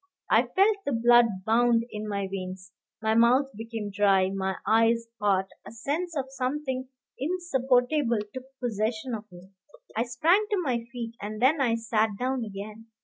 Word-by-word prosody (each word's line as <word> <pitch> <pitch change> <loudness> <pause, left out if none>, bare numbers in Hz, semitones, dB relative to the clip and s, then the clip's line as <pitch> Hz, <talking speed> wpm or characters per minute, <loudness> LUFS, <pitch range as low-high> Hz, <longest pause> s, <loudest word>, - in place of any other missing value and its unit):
I - - +4
felt 405 +2 +4
the 280 - -2
blood 240 +1 +6 0.2
bound 230 +1 +3
in 215 0 -5
my 200 -1 -2
veins, 185 0 -6 0.3
my 220 0 +2
mouth 250 +4 +4
became 225 -1 -5
dry, 195 -2 +3
my 190 -1 -2
eyes 230 +1 +3
hot; 195 -2 +1
a - - -10
sense 300 +9 -3
of 270 - -1
something 260 -1 -3 0.3
insupportable 270 -5 +1 0.2
took 260 0 -7
possession 225 +1 -2
of 215 -2 -6
me. 180 +2 -14 0.4
I 230 +2 +1
sprang 330 - +2
to 415 - +1
my 240 -5 -1
feet, 235 -2 -5
and 215 +1 -5
then 275 +5 +3
I 235 -4 +2
sat 220 -2 0
down 255 +1 -1
again. 210 +2 -8
230 Hz, 160 wpm, -27 LUFS, 210-260 Hz, 0.4 s, blood